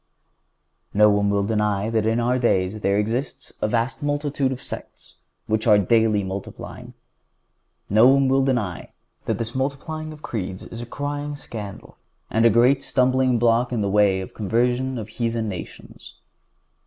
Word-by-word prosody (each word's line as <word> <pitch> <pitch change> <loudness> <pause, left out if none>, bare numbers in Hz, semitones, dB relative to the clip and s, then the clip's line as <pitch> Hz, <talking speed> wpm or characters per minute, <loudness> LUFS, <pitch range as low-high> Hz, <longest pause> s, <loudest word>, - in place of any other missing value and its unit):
No 105 0 +6
one 100 0 +2
will 100 0 +1
deny 105 0 0
that 110 -1 +1
in 115 +1 +1
our 125 +2 +1
days 100 -3 +1
there 100 -1 +1
exists 115 +6 -3
a - - +2
vast 115 +6 -1
multitude 145 -2 -1
of 130 - -4
sects, - - -9 0.3
which 110 +1 -1
are 105 -2 +7
daily 110 +1 +3
multiplying. 95 +1 -7 0.9
No 110 +4 +6
one 135 0 +4
will 135 +1 +3
deny(149) 110 - -1 0.4
that - - -1
this 115 0 -4
multiplying 145 +4 -3
of 155 -1 -12
creeds 95 -4 -4
is 115 - -8
a 120 - -7
crying 145 +2 -4
scandal, 105 -8 -9 0.3
and 115 +1 +3
a - - +8
great 125 +5 +4
stumbling 130 -1 +2
block 120 +1 +2
in 120 -3 -1
the 100 -1 0
way 100 -2 +3
of 95 - -7
the - - -29
conversion 125 +5 0
of 110 -3 -5
heathen 115 0 -2
nations. 95 -4 -9
115 Hz, 165 wpm, -23 LUFS, 105-130 Hz, 0.9 s, a